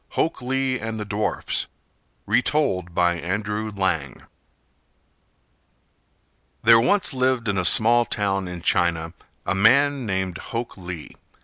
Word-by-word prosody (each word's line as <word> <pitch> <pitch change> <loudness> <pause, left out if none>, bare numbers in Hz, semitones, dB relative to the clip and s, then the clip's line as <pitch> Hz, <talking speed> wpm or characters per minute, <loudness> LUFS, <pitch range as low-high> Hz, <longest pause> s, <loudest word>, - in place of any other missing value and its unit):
HOK 160 - -1
LEE 130 0 -1
AND 110 0 -5
THE 105 - -4
DWARFS 105 +1 -2 0.6
Retold 120 - 0
by 85 -1 +1
Andrew 105 +5 -3
Lang 85 -10 -2 2.4
There 115 +1 +7
once 195 - +2
lived 130 -2 0
in 100 - 0
a - - 0
small 115 +6 +6
town 100 -3 -2
in 90 -1 -8
China 85 -3 0 0.3
a - - 0
man 135 +6 +3
named 95 -2 -2
Hok 115 0 -5
Lee. 90 -4 -9
105 Hz, 120 wpm, -23 LUFS, 90-120 Hz, 2.4 s, There